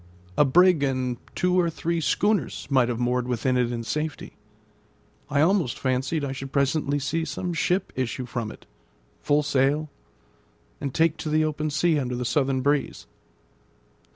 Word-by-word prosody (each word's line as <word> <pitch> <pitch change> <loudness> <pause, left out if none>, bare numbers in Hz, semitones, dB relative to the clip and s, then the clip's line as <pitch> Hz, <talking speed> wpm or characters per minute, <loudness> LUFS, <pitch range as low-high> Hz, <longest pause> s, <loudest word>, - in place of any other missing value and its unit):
A - - +5
brig 175 +3 +5
and 130 -3 -1 0.2
two 180 0 +2
or 170 -1 +2
three 165 +1 -2
schooners 205 - 0
might 130 -3 +4
have 120 -1 -2
moored 125 0 0
within 125 +1 0
it 125 -1 +1
in 115 -1 -3
safety. 150 +5 -4 0.9
I 145 -1 +2
almost 170 -5 +2
fancied 135 +4 -1
I 135 - -3
should 135 0 -6
presently 140 +1 +1
see 145 +4 -1
some 165 +4 -3
ship 180 +3 0
issue 130 0 -2
from 115 -3 -4
it, - - -14 0.6
full 150 0 +2
sail, 145 +1 +1 0.9
and 140 -2 -3
take 165 +2 +2
to 155 - -4
the 155 +1 +2
open 155 0 -2
sea 150 +2 +2
under 125 -2 -2
the 125 0 -3
southern 135 0 +1
breeze. 145 +1 0
145 Hz, 160 wpm, -25 LUFS, 130-155 Hz, 0.9 s, A